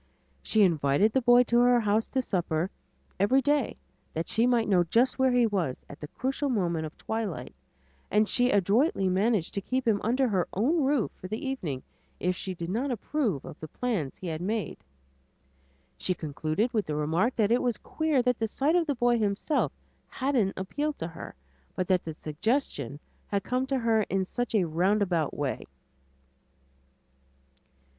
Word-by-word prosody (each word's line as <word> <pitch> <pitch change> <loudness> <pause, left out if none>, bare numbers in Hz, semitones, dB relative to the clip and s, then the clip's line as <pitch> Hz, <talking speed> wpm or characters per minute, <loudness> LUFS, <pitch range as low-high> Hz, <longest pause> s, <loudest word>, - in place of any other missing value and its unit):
She 215 - +3
invited 165 +4 +3
the 265 - +3
boy 245 0 +6
to 235 0 +2
her 245 0 +5
house 215 0 +1
to 260 -1 -1
supper 175 -4 -1 0.5
every 205 +8 +4
day 285 -1 +1 0.4
that 165 +1 -2
she 230 +2 +2
might 240 -2 +2
know 185 -4 +4
just 240 +10 +2
where 260 0 +4
he 245 -1 +4
was 185 - -1
at 145 - -11
the 150 - -7
crucial 270 - -2
moment 170 -9 0
of 155 - -14
twilight, 200 - -4 0.6
and 210 +1 +3
she 245 +5 +2
adroitly 205 - +2
managed 195 -1 +1
to 200 - -2
keep 255 +5 -2
him 210 -3 +2
under 255 +4 +2
her 190 -6 0
own 285 - +2
roof 270 -4 +1
for 185 - -10
the 215 +7 -4
evening 165 - -3 0.4
if 180 +1 0
she 185 0 -4
did 170 +1 -5
not 250 +7 -1
approve 240 - -1
of - - -10
the 155 - -7
plans 195 - -3
he - - -10
had 160 -1 -3
made. 210 +3 -2 1.2
She 185 - -1
concluded 155 - -2
with 215 -3 0
the 150 - -2
remark 165 - +1
that 215 -1 +2
it 240 - +3
was 240 -3 0
queer 310 -5 0
that 250 -1 +1
the 225 - 0
sight 285 +9 +1
of 345 -2 +2
the 285 - 0
boy 240 -1 +2
himself 210 +8 0 0.4
hadn't 255 -7 0
appealed 290 +11 -2
to 165 - -4
her, 165 - -9 0.4
but 185 - -1
that 185 -1 +3
the 160 -1 -6
suggestion 155 - -2 0.3
had 200 -1 -1
come 255 +1 -1
to 270 0 0
her 230 -3 +2
in 190 -1 0
such 245 +4 -3
a 200 - +4
roundabout 175 -1 +1
way. 145 -3 -3
215 Hz, 180 wpm, -28 LUFS, 175-250 Hz, 1.2 s, boy